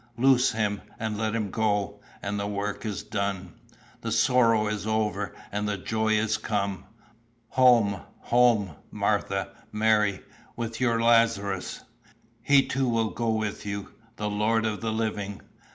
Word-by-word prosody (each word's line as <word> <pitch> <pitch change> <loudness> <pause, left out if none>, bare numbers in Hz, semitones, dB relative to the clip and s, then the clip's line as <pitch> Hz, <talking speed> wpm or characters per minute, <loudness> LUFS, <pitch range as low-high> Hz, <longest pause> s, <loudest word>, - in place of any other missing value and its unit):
'Loose 130 0 +4
him 105 -2 -1 0.2
and 110 -1 -2
let 110 +1 -1
him 105 -4 -2
go,' 105 -2 0 0.2
and 100 +1 -2
the 100 - -2
work 105 +2 -3
is 105 -3 -4
done. 100 -3 -3 0.5
The - - -3
sorrow 115 -4 +4
is 105 -1 -3
over, 105 -3 -1 0.2
and 105 +1 -1
the 100 - -1
joy 110 +3 0
is 110 0 +1
come. 100 -3 -2 0.6
Home, 115 -7 +4 0.2
home, 120 -6 +3 0.2
Martha, - - -1 0.2
Mary, 105 -2 +2 0.3
with 115 +1 -4
your 115 -2 +2
Lazarus! 115 -5 +2 0.6
He 140 -1 +5
too 130 -1 0
will 115 -2 +1
go 115 +1 -2
with 110 -1 -1
you, 100 -1 -5 0.3
the 105 - -3
Lord 110 +2 +1
of 110 -1 -2
the 115 -1 -1
Living. 105 -3 -2
110 Hz, 145 wpm, -27 LUFS, 100-115 Hz, 0.6 s, He